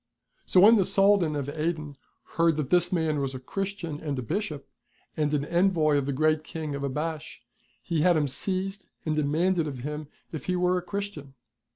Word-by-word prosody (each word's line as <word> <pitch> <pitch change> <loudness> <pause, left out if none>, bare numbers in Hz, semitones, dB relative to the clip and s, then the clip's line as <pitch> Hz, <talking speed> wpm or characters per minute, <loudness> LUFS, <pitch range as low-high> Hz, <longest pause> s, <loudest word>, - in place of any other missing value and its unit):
So 180 - +5
when 220 +4 +8
the 195 - +4
Soldan 195 -4 +3
of 140 -2 -3
Aden 155 -1 -3 0.4
heard 165 -2 +3
that 145 -4 -3
this 175 -1 +4
man 160 -4 +1
was 135 -1 -2
a - - -5
Christian 185 +1 -4
and 145 -4 -3
a 130 - -3
Bishop, 155 - -3 0.5
and 150 -1 0
an 145 -1 0
envoy 170 -3 +2
of 140 -1 0
the - - 0
Great 155 +2 +2
King 155 -2 -5
of 140 0 -4
Abash, 155 +3 -4 0.4
he 165 -3 -1
had 175 0 +4
him 150 -2 +1
seized 190 +7 -2
and 155 -1 0
demanded 160 +3 +1
of 140 -3 -5
him 150 0 -5 0.2
if 160 - -6
he 185 - 0
were 180 0 +2
a 180 - 0
Christian 180 -8 -6
155 Hz, 195 wpm, -27 LUFS, 145-180 Hz, 0.5 s, when